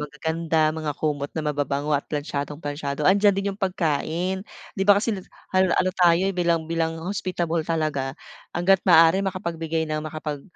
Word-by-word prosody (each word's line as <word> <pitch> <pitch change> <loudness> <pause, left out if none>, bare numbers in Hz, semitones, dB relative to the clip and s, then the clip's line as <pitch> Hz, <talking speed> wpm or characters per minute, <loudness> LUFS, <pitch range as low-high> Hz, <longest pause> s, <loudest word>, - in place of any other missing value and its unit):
magaganda, 160 +1 0
mga 155 -2 -4
kumot 145 -2 -2
na 155 - -2
mababango 145 0 -1
at 145 -1 0
plantsadong-plantsado, 145 0 -4
andiyan 200 +2 +4
din 200 0 -1
yung 200 - -14
pagkain. 180 0 -1 0.3
Di 195 - -7
ba 200 - +8
kasi 220 +2 0
lut 190 -2 -7 0.2
hal 185 0 +4
ano 185 0 +2
tayo 175 0 +4
bilang 170 -3 +1
bilang 165 0 -1
hospitable 175 -3 -1
talaga, 150 -4 -2 0.4
hangga't 185 +2 +4
maaari 165 +2 +7
makapagbigay 165 -4 -2
ng 155 -1 -2
makapag, 150 -2 -5
165 Hz, 155 wpm, -24 LUFS, 150-185 Hz, 0.4 s, ba